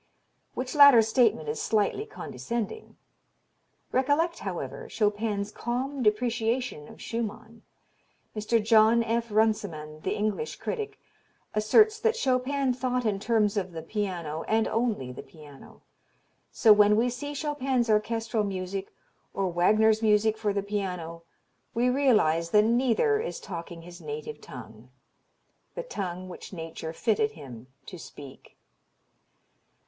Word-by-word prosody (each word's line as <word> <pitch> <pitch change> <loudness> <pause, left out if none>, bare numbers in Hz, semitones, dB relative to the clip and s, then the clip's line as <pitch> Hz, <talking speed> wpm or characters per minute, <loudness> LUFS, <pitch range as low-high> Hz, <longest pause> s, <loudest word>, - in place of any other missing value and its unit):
Which 255 0 -4
latter 280 -6 +8
statement 220 - +2
is 150 +1 -3
slightly 220 - 0
condescending. 240 - -5 0.9
Recollect, 290 +6 +1
however, 465 -2 -5
Chopin's 210 -1 -1
calm 255 +5 -3
depreciation 230 - 0
of - - -14
Schumann. 225 0 -5 0.7
Mr. 215 +2 +1
John 225 +1 +5
F. 230 +1 -1
Runciman, 205 -8 0
the - - -2
English 215 - -2
critic, 430 -3 -5 0.6
asserts 425 - +4
that 450 0 +2
"Chopin 265 - +1
thought 250 -1 -1
in 205 -3 0
terms 215 -1 +1
of 185 -3 -2
the 160 -1 -6
piano, 170 -5 -3
and 220 0 +2
only 220 - -1
the 125 - -8
piano. 150 -4 -15 0.7
So 220 -3 +6
when 210 0 +5
we 240 +3 +2
see 290 +4 -6
Chopin's 270 -4 -1
orchestral 225 +1 0
music 190 0 -4 0.4
or 195 -1 0
Wagner's 215 +5 +3
music 215 0 +3
for 215 -2 -1
the 200 0 -1
piano 180 -5 -4 0.5
we 245 +2 +2
realize 210 - +2
that 210 +3 +5
neither 255 - +2
is 455 - -4
talking 170 -2 -8
his 175 0 -12
native 450 0 -6
tongue - - -11 0.9
the - - -4
tongue 185 - -5
which 185 - -10
nature 165 -1 -6
fitted 215 +4 0
him 130 -5 -11 0.2
to 180 - -9
speak." 140 -4 -12
220 Hz, 125 wpm, -27 LUFS, 195-250 Hz, 0.9 s, latter